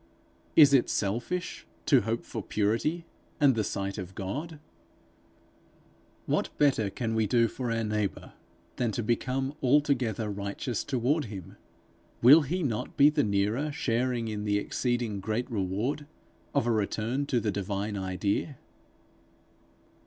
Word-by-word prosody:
Is 145 Hz, -3 st, +8 dB
it 135 Hz, -, +4 dB
selfish 120 Hz, -, -2 dB, 0.2 s
to 135 Hz, -5 st, +5 dB
hope 115 Hz, +3 st, -2 dB
for 110 Hz, -, -5 dB
purity 115 Hz, -, 0 dB, 0.3 s
and 140 Hz, -3 st, +5 dB
the 110 Hz, -2 st, 0 dB
sight 100 Hz, +1 st, -3 dB
of 95 Hz, 0 st, -7 dB
God? 150 Hz, -, -5 dB, 1.7 s
What -, -, 0 dB
better 130 Hz, -8 st, +3 dB
can 115 Hz, +2 st, -3 dB
we 110 Hz, -1 st, +1 dB
do 115 Hz, +2 st, +3 dB
for 125 Hz, +1 st, -4 dB
our 115 Hz, 0 st, 0 dB
neighbour 105 Hz, -2 st, -2 dB, 0.4 s
than 120 Hz, -3 st, 0 dB
to 120 Hz, -, -2 dB
become 130 Hz, +4 st, -1 dB
altogether 130 Hz, -6 st, +2 dB
righteous 100 Hz, +3 st, -3 dB
toward 140 Hz, +3 st, 0 dB
him? 100 Hz, -6 st, -9 dB, 0.6 s
Will 140 Hz, +7 st, +8 dB
he 170 Hz, +6 st, -2 dB
not 115 Hz, -1 st, -3 dB
be 145 Hz, +1 st, +7 dB
the -, -, +2 dB
nearer 105 Hz, +8 st, 0 dB
sharing 120 Hz, -2 st, -1 dB
in 105 Hz, -1 st, -3 dB
the 105 Hz, -1 st, +1 dB
exceeding 120 Hz, -1 st, -1 dB
great 110 Hz, +5 st, -2 dB
reward 110 Hz, +9 st, -2 dB, 0.5 s
of -, -, +2 dB
a 120 Hz, -, +2 dB
return 115 Hz, +5 st, -1 dB
to 125 Hz, -, +1 dB
the 110 Hz, -2 st, -1 dB
divine 100 Hz, +1 st, -3 dB
idea? 100 Hz, -, -2 dB
115 Hz, 140 wpm, -28 LUFS, 105-135 Hz, 1.7 s, Is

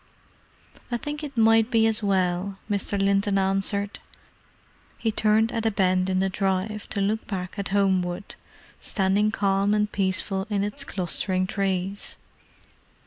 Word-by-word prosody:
"I 240 Hz, -, +1 dB
think 295 Hz, +4 st, -5 dB
it 280 Hz, -4 st, -7 dB
might 225 Hz, 0 st, +5 dB
be 225 Hz, -3 st, +3 dB
as 220 Hz, -1 st, +1 dB
well," 190 Hz, -1 st, 0 dB
Mr. 200 Hz, -1 st, -1 dB
Linton 195 Hz, 0 st, +2 dB
answered. 195 Hz, +1 st, 0 dB, 1.0 s
He 225 Hz, -, 0 dB
turned 220 Hz, +1 st, +3 dB
at 225 Hz, -1 st, -1 dB
a -, -, +4 dB
bend 185 Hz, -2 st, +1 dB
in 185 Hz, -, +1 dB
the 190 Hz, +1 st, +2 dB
drive, 195 Hz, +2 st, -2 dB
to 200 Hz, -, -1 dB
look 215 Hz, +3 st, -1 dB
back 185 Hz, -3 st, -4 dB
at 200 Hz, -, -2 dB
Homewood, 190 Hz, -2 st, 0 dB, 0.5 s
standing 200 Hz, +1 st, +1 dB
calm 200 Hz, -1 st, +1 dB
and 210 Hz, 0 st, 0 dB
peaceful 190 Hz, 0 st, -1 dB
in 200 Hz, -2 st, 0 dB
its 205 Hz, 0 st, -2 dB
clustering 185 Hz, 0 st, -1 dB
trees. 195 Hz, 0 st, -2 dB
200 Hz, 140 wpm, -25 LUFS, 190-215 Hz, 1.0 s, might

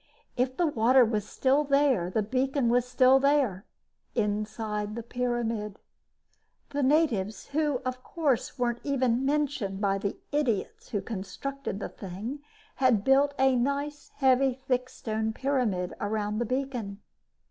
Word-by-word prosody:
If 255 Hz, +1 st, 0 dB
the 350 Hz, -, +3 dB
water 255 Hz, -2 st, +4 dB
was 215 Hz, -2 st, -2 dB
still 275 Hz, +3 st, +2 dB
there, 275 Hz, -10 st, +2 dB
the 215 Hz, +3 st, 0 dB
beacon 260 Hz, +3 st, 0 dB
was 245 Hz, +1 st, +3 dB
still 255 Hz, +1 st, +5 dB
there 265 Hz, -8 st, +1 dB, 0.5 s
inside 210 Hz, -1 st, -2 dB
the 235 Hz, -, -5 dB
pyramid. 235 Hz, -4 st, -2 dB, 0.9 s
The 285 Hz, 0 st, -1 dB
natives, 255 Hz, -9 st, +1 dB
who, 295 Hz, -3 st, 0 dB
of 255 Hz, 0 st, -4 dB
course, 285 Hz, -6 st, -1 dB
weren't 240 Hz, -1 st, -1 dB
even 260 Hz, -3 st, +1 dB
mentioned 275 Hz, -9 st, -1 dB
by 195 Hz, -1 st, +1 dB
the 200 Hz, 0 st, -3 dB
idiots 265 Hz, -9 st, -1 dB
who 205 Hz, -, -1 dB
constructed 225 Hz, +4 st, -5 dB
the -, -, -3 dB
thing, 205 Hz, +9 st, -6 dB, 0.4 s
had 250 Hz, -6 st, +3 dB
built 280 Hz, +3 st, +4 dB
a 265 Hz, 0 st, +4 dB
nice 280 Hz, +4 st, -2 dB
heavy, 265 Hz, -1 st, +3 dB
thick 255 Hz, -1 st, -1 dB
stone 220 Hz, 0 st, -3 dB
pyramid 235 Hz, -9 st, 0 dB
around 210 Hz, 0 st, -1 dB
the 240 Hz, -, 0 dB
beacon. 250 Hz, -6 st, -3 dB
250 Hz, 135 wpm, -28 LUFS, 215-275 Hz, 0.9 s, still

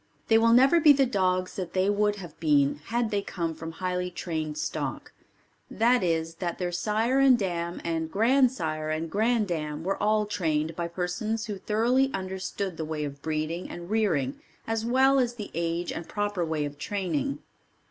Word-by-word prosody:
They 225 Hz, -, +6 dB
will 230 Hz, 0 st, +4 dB
never 265 Hz, +8 st, +6 dB
be 300 Hz, -2 st, +8 dB
the 275 Hz, -1 st, +3 dB
dogs 185 Hz, -5 st, 0 dB
that 180 Hz, -3 st, -4 dB
they 185 Hz, +1 st, +2 dB
would 205 Hz, 0 st, +2 dB
have 175 Hz, -6 st, -10 dB
been 145 Hz, -2 st, +3 dB
had 235 Hz, -1 st, -1 dB
they 205 Hz, -1 st, +1 dB
come 170 Hz, -4 st, -3 dB
from 165 Hz, +1 st, -7 dB
highly 180 Hz, +1 st, -2 dB
trained 160 Hz, -4 st, -4 dB
stock, -, -, -4 dB, 0.6 s
that 240 Hz, +2 st, +3 dB
is 165 Hz, -1 st, -1 dB
that 175 Hz, -2 st, -2 dB
their 180 Hz, -1 st, -2 dB
sire 215 Hz, +8 st, +1 dB
and 270 Hz, -2 st, +6 dB
dam 175 Hz, -4 st, -2 dB
and 160 Hz, -1 st, -2 dB
grand 250 Hz, +6 st, +4 dB
sire 155 Hz, -8 st, -3 dB
and 160 Hz, +1 st, -2 dB
grand 220 Hz, +1 st, +2 dB
dam 150 Hz, -2 st, -3 dB
were 195 Hz, +3 st, -2 dB
all 215 Hz, 0 st, +2 dB
trained 160 Hz, -5 st, -1 dB
by 170 Hz, 0 st, -2 dB
persons 185 Hz, +6 st, -2 dB
who 205 Hz, -4 st, -5 dB
thoroughly 240 Hz, +7 st, +2 dB
understood 190 Hz, -1 st, -4 dB
the 160 Hz, -, -3 dB
way 155 Hz, -1 st, -3 dB
of 140 Hz, -1 st, -7 dB
breeding 155 Hz, +3 st, -3 dB
and 175 Hz, +2 st, -8 dB
rearing 165 Hz, -12 st, +1 dB, 0.3 s
as 225 Hz, -1 st, -1 dB
well 265 Hz, +3 st, +4 dB
as 245 Hz, -2 st, 0 dB
the 210 Hz, -4 st, -7 dB
age 170 Hz, +1 st, -2 dB
and 165 Hz, -, -6 dB
proper 205 Hz, -3 st, -1 dB
way 160 Hz, -2 st, -1 dB
of 145 Hz, 0 st, -7 dB
training. 195 Hz, -, -2 dB
185 Hz, 185 wpm, -27 LUFS, 165-220 Hz, 0.6 s, be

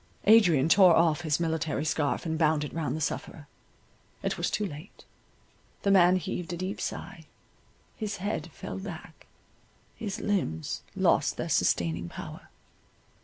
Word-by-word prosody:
Adrian 180 Hz, -10 st, +6 dB
tore 180 Hz, -1 st, +7 dB
off 165 Hz, -1 st, +3 dB
his 155 Hz, -2 st, 0 dB
military 160 Hz, -2 st, -1 dB
scarf 150 Hz, 0 st, 0 dB
and 160 Hz, -1 st, -1 dB
bound 155 Hz, -2 st, +3 dB
it 150 Hz, -, -6 dB
round 160 Hz, -3 st, -2 dB
the -, -, -5 dB
sufferer—it 145 Hz, 0 st, -7 dB
was -, -, -1 dB
too 210 Hz, -, -1 dB
late—the 185 Hz, +4 st, -8 dB
man 180 Hz, -2 st, +6 dB
heaved 180 Hz, -1 st, -3 dB
a 175 Hz, -, -4 dB
deep 185 Hz, +3 st, -4 dB
sigh, -, -, -6 dB, 0.7 s
his 215 Hz, -2 st, -4 dB
head 185 Hz, -4 st, -3 dB
fell 190 Hz, +5 st, -7 dB
back, 175 Hz, -4 st, -9 dB, 0.7 s
his 210 Hz, -4 st, -5 dB
limbs 80 Hz, -, -2 dB
lost -, -, +2 dB
their -, -, -3 dB
sustaining 85 Hz, 0 st, +1 dB
power. -, -, -9 dB
165 Hz, 135 wpm, -28 LUFS, 150-190 Hz, 0.7 s, tore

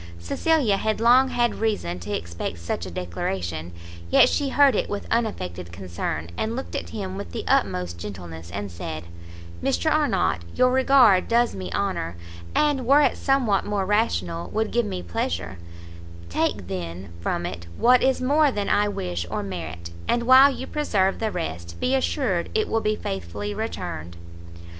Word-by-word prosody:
Cecilia 220 Hz, -, +1 dB
had 215 Hz, +2 st, -1 dB
long 245 Hz, +3 st, +6 dB
had 240 Hz, -2 st, 0 dB
reason 205 Hz, -, -1 dB
to 85 Hz, -, -7 dB
expect 85 Hz, 0 st, -4 dB
such 85 Hz, +1 st, -4 dB
a -, -, -6 dB
declaration, 85 Hz, -1 st, -4 dB, 0.4 s
yet -, -, +6 dB
she 285 Hz, -2 st, 0 dB
heard 280 Hz, 0 st, +5 dB
it -, -, 0 dB
with 205 Hz, -, -4 dB
unaffected 90 Hz, -, -2 dB
concern, 85 Hz, -3 st, -4 dB
and 220 Hz, +1 st, -2 dB
looking 265 Hz, -, -3 dB
at 85 Hz, -, -13 dB
him 95 Hz, +2 st, -5 dB
with 95 Hz, -4 st, -7 dB
the -, -, -3 dB
utmost 90 Hz, -1 st, +1 dB
gentleness, 85 Hz, -3 st, -8 dB, 0.2 s
said 80 Hz, -2 st, -6 dB, 0.6 s
"Mr 85 Hz, 0 st, +1 dB
Arnott, -, -, +2 dB
your 255 Hz, 0 st, +4 dB
regard 255 Hz, -7 st, +5 dB
does 235 Hz, +1 st, +3 dB
me 90 Hz, -2 st, -6 dB
honour, 85 Hz, 0 st, -2 dB, 0.4 s
and, 285 Hz, -5 st, +2 dB
were 280 Hz, +3 st, +6 dB
it -, -, +3 dB
somewhat 255 Hz, -8 st, +2 dB
more 205 Hz, -2 st, -1 dB
rational, 90 Hz, -, 0 dB
would 220 Hz, 0 st, -1 dB
give 240 Hz, -2 st, +1 dB
me 90 Hz, -, -4 dB
pleasure; 85 Hz, +1 st, -3 dB, 0.7 s
take, 95 Hz, +2 st, -1 dB
then, 90 Hz, -1 st, -6 dB
from 85 Hz, 0 st, -2 dB
it 85 Hz, -1 st, -6 dB
what 250 Hz, +1 st, +5 dB
is 265 Hz, 0 st, +2 dB
more 290 Hz, +4 st, +3 dB
than 205 Hz, -4 st, -2 dB
I 205 Hz, 0 st, +3 dB
wish 90 Hz, -, -3 dB
or -, -, -2 dB
merit, 85 Hz, -3 st, -6 dB, 0.2 s
and, 235 Hz, -, +1 dB
while 260 Hz, +3 st, +8 dB
you 265 Hz, -1 st, -5 dB
preserve 200 Hz, -12 st, 0 dB
the 220 Hz, -, 0 dB
rest, 85 Hz, -, -5 dB
be 255 Hz, -, +1 dB
assured 255 Hz, -, 0 dB
it 435 Hz, 0 st, +2 dB
will 225 Hz, -, 0 dB
be 215 Hz, 0 st, +1 dB
faithfully 95 Hz, -, -4 dB
returned." 85 Hz, -3 st, -5 dB
100 Hz, 165 wpm, -24 LUFS, -, 0.7 s, while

